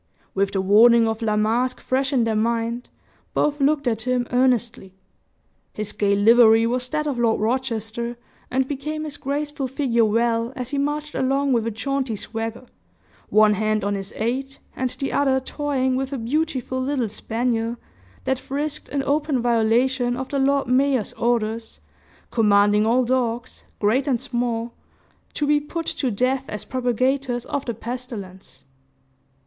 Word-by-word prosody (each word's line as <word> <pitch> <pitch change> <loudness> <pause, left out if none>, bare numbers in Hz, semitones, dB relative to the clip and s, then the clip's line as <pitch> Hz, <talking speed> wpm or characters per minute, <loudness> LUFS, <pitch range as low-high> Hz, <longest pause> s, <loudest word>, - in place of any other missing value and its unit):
With 195 0 0
the 190 - +1
warning 225 +4 +6
of 225 +1 -2
La 215 -2 +1
Masque 235 +4 +1
fresh 265 +2 0
in 255 -4 +2
their 225 -1 0
mind, 230 +2 -1 0.5
both 295 0 +1
looked 285 -1 +2
at 225 -2 0
him 250 0 0
earnestly. 240 -6 +1 0.8
His 210 -1 -3
gay 200 -1 +1
livery 225 +2 +6
was 250 +2 -1
that 305 +1 -1
of 275 -5 -2
Lord 230 -2 +2
Rochester, 235 0 -2 0.3
and 260 0 0
became 300 +3 -4
his 300 -2 -5
graceful 290 0 -3
figure 250 -3 +1
well, 230 +2 +1
as 250 0 -5
he 285 - -1
marched 295 +1 -2
along 275 +1 +1
with 230 -2 +1
a - - +1
jaunty 255 +2 -2
swagger, 225 +3 -5 0.6
one 215 0 +5
hand 215 0 0
on 205 0 0
his 195 0 -4
aide, 265 +4 -2 0.2
and 260 -1 -1
the 275 +2 -4
other 270 -2 +2
toying 265 -1 -1
with 265 +1 -2
a 275 - -2
beautiful 260 0 -1
little 260 -3 0
spaniel, 230 +2 -2 0.5
that 265 -1 0
frisked 290 +3 -4
in 280 -1 -1
open 290 -1 +1
violation 245 +2 +2
of 265 0 -5
the 280 - -1
Lord 275 +1 +2
Mayor's 260 -2 +2
orders, 230 -1 -1 0.5
commanding 210 -1 +4
all 250 +2 +3
dogs, 245 -1 -2
great 235 +7 +1
and 255 -4 +1
small, 235 -1 -2 0.6
to 295 - 0
be 295 0 +3
put 330 +3 -5
to 265 - -1
death 255 +5 0
as 210 - -6
propagators 255 0 0
of 285 - -3
the 235 - -3
pestilence. 230 -6 -8
245 Hz, 155 wpm, -23 LUFS, 225-270 Hz, 0.8 s, warning